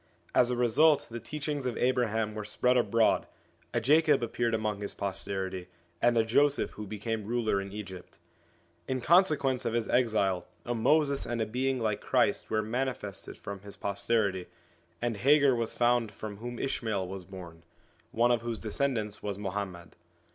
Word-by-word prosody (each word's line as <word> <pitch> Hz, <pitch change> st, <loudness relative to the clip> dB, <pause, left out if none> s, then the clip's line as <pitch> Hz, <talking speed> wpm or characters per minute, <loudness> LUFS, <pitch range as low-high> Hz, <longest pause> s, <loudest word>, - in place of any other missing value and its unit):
As 125 Hz, -, +4 dB
a 125 Hz, -, 0 dB
result 140 Hz, +6 st, +4 dB
the 115 Hz, -, -4 dB
teachings 145 Hz, 0 st, -4 dB
of 120 Hz, -, -3 dB
Abraham 115 Hz, -4 st, +1 dB
were 105 Hz, 0 st, -5 dB
spread 125 Hz, +4 st, +2 dB
abroad, 115 Hz, -2 st, +3 dB, 0.4 s
a -, -, +1 dB
Jacob 150 Hz, +1 st, +4 dB
appeared 120 Hz, 0 st, 0 dB
among 105 Hz, -2 st, -2 dB
his 100 Hz, -, -5 dB
posterity, 95 Hz, -2 st, -3 dB, 0.3 s
and 120 Hz, -1 st, +4 dB
a 110 Hz, -, +4 dB
Joseph 140 Hz, +5 st, +2 dB
who 105 Hz, -1 st, -8 dB
became 110 Hz, +1 st, -4 dB
ruler 115 Hz, -4 st, +1 dB
in 100 Hz, 0 st, -7 dB
Egypt. 95 Hz, -3 st, -9 dB, 0.7 s
In 130 Hz, 0 st, -1 dB
consequence 150 Hz, -5 st, +3 dB
of 115 Hz, -2 st, -1 dB
his 115 Hz, -1 st, 0 dB
exile 100 Hz, -7 st, +1 dB, 0.2 s
a 120 Hz, -, -1 dB
Moses 140 Hz, +4 st, +2 dB
and 120 Hz, 0 st, -2 dB
a 110 Hz, -, +1 dB
being 130 Hz, +4 st, -1 dB
like 110 Hz, -3 st, -1 dB
Christ -, -, +1 dB
were 110 Hz, 0 st, +1 dB
manifested 110 Hz, -4 st, -3 dB
from 100 Hz, -1 st, -7 dB
his 100 Hz, +1 st, -10 dB
pos 100 Hz, 0 st, -4 dB
terity, 100 Hz, -6 st, +1 dB, 0.6 s
and 120 Hz, -3 st, -1 dB
Hagar 140 Hz, +4 st, +5 dB
was 115 Hz, -2 st, -1 dB
found 120 Hz, -2 st, +2 dB
from 105 Hz, 0 st, -7 dB
whom 120 Hz, +2 st, -6 dB
Ishmael 110 Hz, -8 st, -2 dB
was 95 Hz, 0 st, -6 dB
born, 90 Hz, -3 st, -10 dB, 0.5 s
one 120 Hz, +2 st, +2 dB
of 120 Hz, -2 st, +2 dB
whose 115 Hz, -1 st, -3 dB
descendants 110 Hz, -2 st, -2 dB
was 100 Hz, -2 st, -3 dB
Muhammad. 95 Hz, -3 st, -5 dB
115 Hz, 170 wpm, -30 LUFS, 100-125 Hz, 0.7 s, Hagar